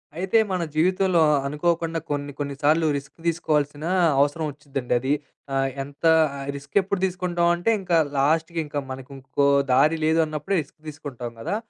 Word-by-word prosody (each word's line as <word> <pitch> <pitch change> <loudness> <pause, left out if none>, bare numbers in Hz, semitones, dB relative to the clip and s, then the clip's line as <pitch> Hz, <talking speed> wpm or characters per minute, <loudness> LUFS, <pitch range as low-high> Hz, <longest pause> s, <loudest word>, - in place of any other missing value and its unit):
అయితే 185 +5 +1
మన 185 - 0
జీవితంలో 185 +1 +3
అ - - +4 0.2
అనుకోకుండా 165 +2 0
కొన్ని 145 0 -2
కొన్ని 140 -1 -3
సార్లు 155 +3 +3
రిస్క్ 140 0 -10
తీసుకోవాల్సిన 150 -2 0 0.3
అవసరం 145 +3 +1
ఒచ్చిద్దండది. 135 -2 -2 0.4
ఆహ్, 135 0 +1
ఎంత 140 +3 -14 0.3
ఆ - - -7 0.2
రిస్క్ 140 0 -11
ఎప్పుడు 195 0 -2
తీసుకుంటాం 175 -2 0
అంటే 175 +6 +1
ఇంకా 175 -3 +1 0.2
లాస్ట్‌కి 160 +4 +1
ఇంకా 145 0 -3
మనకు 130 +1 -8
ఇంకో 135 +2 0 0.3
దారి 150 +5 +4
లేదు 160 +1 +3
అన్నప్పుడే 155 +5 -3
రిస్క్ 150 - -16
తీసుకుంటాం 140 -6 -7
కదా! 115 - -2
150 Hz, 155 wpm, -24 LUFS, 140-170 Hz, 0.4 s, అ